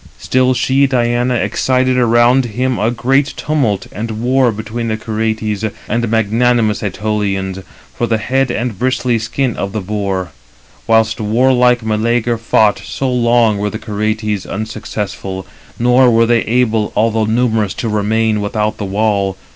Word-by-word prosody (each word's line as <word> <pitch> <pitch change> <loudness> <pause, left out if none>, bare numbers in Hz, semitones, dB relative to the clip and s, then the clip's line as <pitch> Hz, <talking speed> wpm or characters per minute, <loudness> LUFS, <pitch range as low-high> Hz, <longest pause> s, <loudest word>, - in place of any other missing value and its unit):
Still 130 0 +1
she 135 +3 +2
(Diana) 120 -1 +1
excited 130 +1 +1
around 120 +1 +3
him 125 +3 -1
321 105 - 0
a 120 - -1
great 135 +4 +1
tumult 135 -10 -1
and 115 +2 -5
war 125 +1 +2
between 110 +2 -5
the 110 -1 -1
Curetes 110 -1 -2 0.2
and 115 +1 -1
magnanimous 115 0 +1
Ætolians, 95 -2 -2 0.3
for 120 - -2
the 115 - +1
head 130 +4 0
and 120 -4 -3
bristly 125 -2 0
skin 115 +2 -2
of 100 0 -4
the 110 - -2
boar. 95 -3 -3 0.6
322 - - -2
Whilst 110 0 +2
warlike 125 +2 +2
Meleager 115 +2 0
fought, 110 -2 +2
so 135 -1 -3
long 120 -3 +2
were 105 +1 -1
the 110 - -5
Curetes 110 -1 -2
unsuccessful; 100 -3 -5 0.3
nor 125 +2 +4
were 115 0 +4
they 115 0 +2
able, 115 -2 +1
although 110 0 +1
numerous, 110 -3 0
to 115 - -3
remain 110 0 0
without 105 0 -1
the 105 - -3
wall. 100 -1 0
115 Hz, 150 wpm, -15 LUFS, 105-125 Hz, 0.6 s, nor